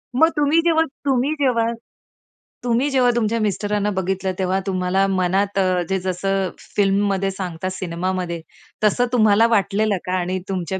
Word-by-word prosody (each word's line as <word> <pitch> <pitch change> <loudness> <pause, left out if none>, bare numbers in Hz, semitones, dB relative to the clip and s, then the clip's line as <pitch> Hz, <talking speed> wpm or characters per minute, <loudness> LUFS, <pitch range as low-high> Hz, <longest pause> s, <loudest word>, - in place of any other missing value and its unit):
मग 320 +5 +5
तुम्ही 295 +2 +3
जेव्हा 320 -1 +4 0.2
तुम्ही 265 0 +2
जेव्हा 250 -5 +2 1.0
तुम्ही 245 +3 +1
जेव्हा 255 -3 +3
तुमच्या 230 -1 0
मिस्टरांना 210 0 0
बघितलं 190 0 -1
तेव्हा 190 0 +1
तुम्हाला 185 0 +1
मनात 195 +1 0
अ, 185 -1 +2
जे 190 0 0
जसं 190 +1 -1 0.3
फिल्ममध्ये 195 -1 +1
सांगतात 185 -1 -4
सिनेमामध्ये, 180 -1 -3 0.4
तसं 215 +4 +3
तुम्हाला 220 -1 +5
वाटलेलं 210 -1 +1
का 185 0 -1
आणि 180 +1 -2
तुमच्या 190 0 -3
195 Hz, 140 wpm, -21 LUFS, 185-230 Hz, 1.0 s, मग